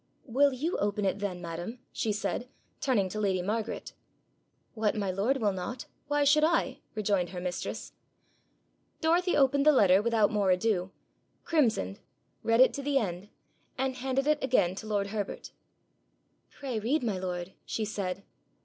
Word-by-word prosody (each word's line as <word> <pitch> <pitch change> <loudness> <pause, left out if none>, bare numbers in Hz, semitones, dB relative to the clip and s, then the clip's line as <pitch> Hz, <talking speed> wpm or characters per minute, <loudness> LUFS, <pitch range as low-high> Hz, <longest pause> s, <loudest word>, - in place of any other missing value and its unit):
'Will 280 +3 +3
you 300 +8 -2
open 205 0 0
it 195 +1 0
then, 195 -3 -3
madam?' 170 +8 -5
she 220 - -1
said, 225 +4 -2 0.3
turning 225 -8 +2
to 215 - -4
lady 190 -3 +1
Margaret. 215 +3 -3 0.8
'What 215 -2 0
my 200 -3 -1
lord 210 +9 +1
will 215 -5 +1
not, 190 +7 -5 0.2
why 290 0 +2
should 295 +2 +5
I?' 330 +1 +2 0.2
rejoined 200 -4 +1
her 180 - -6
mistress. 180 -1 -4 1.1
Dorothy 350 +3 +2
opened 280 0 +4
the 305 - +7
letter 195 -8 +5
without 225 -2 +2
more 205 -3 +1
ado, 185 0 +1 0.5
crimsoned, 225 - +1 0.4
read 230 +2 +3
it 260 - +6
to 280 - -4
the 280 0 +1
end, 195 -4 -2 0.5
and 265 0 0
handed 265 +1 0
it 300 -1 +2
again 215 -9 +3
to 220 - -6
lord 200 -2 0
Herbert. 205 -1 -4 1.0
'Pray 260 -5 -4
read, 255 +7 0
my 210 -6 -1
lord,' 180 0 -4
she 220 - -2
said. 195 -2 -3
215 Hz, 160 wpm, -29 LUFS, 190-265 Hz, 1.1 s, the